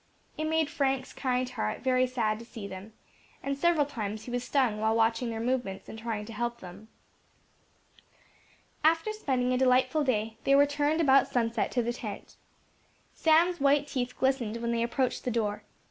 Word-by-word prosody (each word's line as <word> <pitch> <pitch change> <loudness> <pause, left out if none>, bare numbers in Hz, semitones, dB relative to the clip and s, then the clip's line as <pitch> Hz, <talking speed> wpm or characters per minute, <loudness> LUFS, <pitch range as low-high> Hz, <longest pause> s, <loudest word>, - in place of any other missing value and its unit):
It 310 - -3
made 320 -1 +1
Frank's 270 -2 -1
kind 255 -1 -1
heart 250 -3 -3
very 255 -1 +3
sad 220 -4 -1
to 230 - -10
see 225 -3 -9
them, 195 +3 -9 0.5
and 275 0 -1
several 320 0 +2
times 215 -6 -5
he 245 - -8
was 245 0 -2
stung 250 -5 +1
while 220 +1 +1
watching 230 +1 +1
their 225 -1 -4
movements 240 -5 -2
and 220 - -8
trying 220 -2 -4
to 230 - -9
help 235 +2 -3
them. 190 +3 -11 2.0
After 325 +7 +3
spending 255 -11 0
a 250 - +1
delightful 260 +3 +3
day, 220 -4 -1
they 275 - +4
returned 290 +2 +3
about 275 -3 +5
sunset 230 -2 0
to 245 - +1
the 240 +1 -1
tent. 215 -5 -8 0.8
Sam's 335 +2 +3
white 285 +1 +3
teeth 250 -3 -3
glistened 260 -4 0
when 235 0 -2
they 230 0 0
approached 245 +2 -1
the - - -1
door. 215 -3 -2
250 Hz, 175 wpm, -29 LUFS, 225-275 Hz, 2.0 s, about